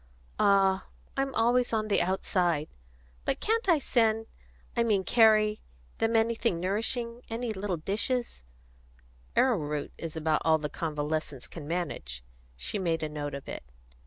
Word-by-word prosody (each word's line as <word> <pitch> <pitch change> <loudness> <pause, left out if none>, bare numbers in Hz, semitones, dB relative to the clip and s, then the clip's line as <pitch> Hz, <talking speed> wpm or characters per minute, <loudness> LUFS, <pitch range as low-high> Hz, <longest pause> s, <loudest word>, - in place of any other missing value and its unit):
"Ah, 195 -1 +4 0.3
I'm 270 0 -1
always 240 +2 +3
on 215 -1 0
the 205 - +3
outside! 175 -4 0 0.5
But - - -1
can't 450 -1 0
I 335 - +6
send 225 -5 +2 0.5
I 235 - +2
mean 210 -5 +2
carry 215 -1 +4 0.4
them 225 +1 +2
anything 225 -4 +2
nourishing, 230 +5 -1
any 230 0 -2
little 190 -2 -2
dishes 210 - -1 0.5
" - - -30
"Arrowroot 150 - +1
is 165 -1 -5
about 160 -1 +1
all 160 -1 +4
the 150 -1 -4
convalescents 150 -3 -3
can 155 -4 -9
manage." 145 - -3 0.3
She 200 - -3
made 165 -3 0
a 155 - -1
note 145 -1 -4
of 140 - -8
it. - - -6
190 Hz, 145 wpm, -29 LUFS, 155-225 Hz, 0.5 s, I